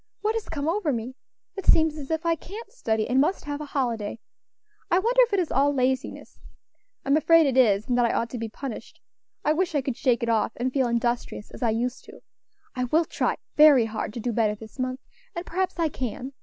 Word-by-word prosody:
What 430 +1 +1
has 450 -1 -4
come 295 -2 -3
over 335 -2 0
me? 240 0 -4 0.4
It 390 - -7
seems 315 -1 +5
as 285 -3 -8
if 320 +1 -2
I 335 - +3
can't 405 +8 -9
study, 220 - -1
and 260 +2 +3
must 355 +4 0
have 290 0 -4
a - - -4
holiday. 235 -7 -2 0.7
I 350 - +3
wonder 470 +6 +1
if - - +3
it 400 - +3
is 345 - -1
all 280 +1 +3
laziness? 260 0 -2 0.7
I'm 275 +1 +3
afraid 330 +1 +5
it 270 -3 +1
is, 215 -5 +4
and 245 - +1
that 240 - +4
I 235 - +1
ought 230 0 -1
to 245 - -5
be 225 -1 -4
punished. 260 +2 -8 0.5
I 300 - +4
wish 340 0 -1
I 285 - +2
could 265 -2 -3
shake 240 -2 +1
it 235 - -1
off, 225 -1 +1
and 250 +1 -2
feel 265 -3 +2
industrious 235 -2 -2
as - - -11
I 235 - +2
used 240 +3 -2
to. - - -14 0.5
I 250 -1 -1
will 320 +7 +2
try - - -1 0.2
very 295 -6 +7
hard 220 -1 -4
to - - -4
do 240 +2 -2
better 215 -2 +1
this 220 +4 -13
month, 255 +1 -2 0.3
and 345 +1 -4
perhaps 370 +2 -2
I 335 -2 +2
can. 255 0 -5
265 Hz, 230 wpm, -25 LUFS, 235-320 Hz, 0.7 s, very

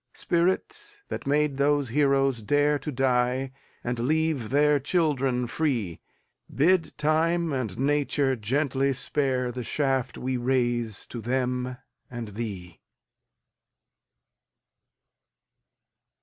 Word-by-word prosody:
Spirit, 405 - -1
that - - -5
made 145 -1 +1
those 145 -1 +2
heroes 135 -2 +2
dareTo 145 +3 +1
die, 130 0 +1 0.3
and 120 0 -2
leave 150 -2 0
their 145 +1 +3
children 135 -5 +1
free, 120 - -1 0.5
Bid 165 +3 +2
Time 160 +2 +1
and 120 -8 -3
Nature 140 0 +1
gently 135 +4 0
spareThe 125 -2 0
shaft 135 -2 -1
we 130 0 -2
raise 120 -3 0
to 120 - -7
them 125 +1 -1 0.3
and 120 -3 -6
thee. 95 -6 -6
135 Hz, 90 wpm, -26 LUFS, 125-150 Hz, 0.5 s, their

